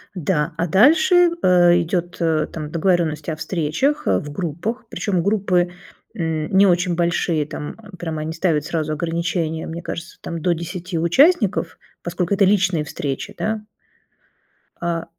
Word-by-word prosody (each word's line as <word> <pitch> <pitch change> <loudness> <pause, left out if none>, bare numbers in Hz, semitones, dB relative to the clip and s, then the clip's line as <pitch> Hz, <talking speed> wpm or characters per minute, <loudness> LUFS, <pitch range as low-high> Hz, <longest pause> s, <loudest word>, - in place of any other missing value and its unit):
Да, 170 -2 -1
а 170 - 0
дальше, 315 - +5
э, 175 -1 +5
идет, 175 +1 -2
э, 160 -2 +2
там 155 -2 -6
договоренность 170 -1 0
о 160 - -2
встречах, 165 - -1
э, 95 -2 +2
в 145 - -8
группах, 175 - -4
причем 185 -7 -1
группы, 185 -3 +1 0.4
м, 160 -2 -2
не 195 +1 +6
очень 175 0 +2
большие, 170 -3 0
там 150 - -6 0.2
прям 160 -2 -4
они 155 +1 -3
ставят 165 -3 0
сразу 155 -2 -2
ограничения. 165 0 -2
Мне 165 +1 -6
кажется, 170 0 -7
там 170 - -5
до 175 +2 +1
10 170 +1 -5
участников, 195 - +3 0.2
поскольку 180 +2 -1
это 195 - +4
личные 190 -5 +2
встречи, 145 +6 -4
да. 215 0 -2 1.2
А. 170 -1 -2
170 Hz, 145 wpm, -21 LUFS, 160-190 Hz, 1.2 s, не